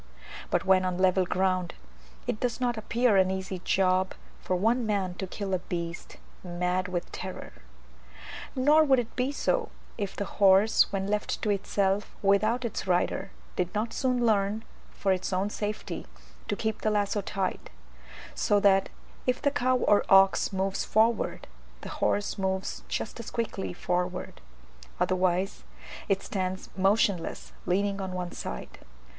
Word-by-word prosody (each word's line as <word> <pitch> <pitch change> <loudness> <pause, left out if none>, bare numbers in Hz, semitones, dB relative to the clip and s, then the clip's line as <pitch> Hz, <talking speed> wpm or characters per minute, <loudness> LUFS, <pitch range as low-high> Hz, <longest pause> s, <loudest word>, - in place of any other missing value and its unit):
But - - 0
when 190 -1 +5
on 180 -1 -1
level 185 0 +3
ground 185 -1 0 0.5
it 215 - -2
does 245 0 -1
not 245 -1 +1
appear 230 0 +2
an 190 -1 +4
easy 190 0 -3
job 185 +1 +1 0.3
for 185 - -1
one 230 +7 +2
man 200 -4 0
to 190 - -3
kill 195 +1 -4
a 185 - +2
beast 170 -1 -5 0.3
mad 180 +1 -1
with 180 -1 -4
terror. - - -7 1.0
Nor 295 +4 +5
would 270 -3 +4
it 240 -2 -3
be 255 +2 0
so, 455 - 0 0.3
if 200 -2 -3
the 200 - -2
horse, 195 +2 +4
when 195 -1 -1
left 210 +1 -1
to 210 - +2
itself 200 0 0
without 215 +5 +3
its 220 - -4
rider, 185 +2 +1 0.3
did 180 +2 -2
not 220 +2 -1
soon 250 -2 +1
learn, 210 0 +2 0.3
for 195 - -1
its 185 +1 -3
own 190 +2 0
safety, 210 - -4 0.4
to - - 0
keep 220 -1 -2
the 215 - +1
lazo 205 -1 +1
tight, 195 -1 -3 0.6
so 205 - +2
that, 195 -1 +4 0.4
if 250 0 +2
the 285 - +1
cow 255 -2 +2
or 205 -4 +3
ox 195 0 +5
moves 195 0 -1
forward, 225 +1 +1 0.4
the - - -7
horse 205 0 0
moves 190 0 -2
just 225 - -4
as 230 - -6
quickly 225 -4 -3
forward; 180 +1 -3 0.6
otherwise, 185 +1 +1 0.5
it 195 -1 +1
stands 185 -1 -3
motionless 195 -2 +1
leaning 200 +2 +1
on 190 -1 -4
one 180 -1 -4
side. 60 - -7
195 Hz, 150 wpm, -28 LUFS, 185-220 Hz, 1.0 s, when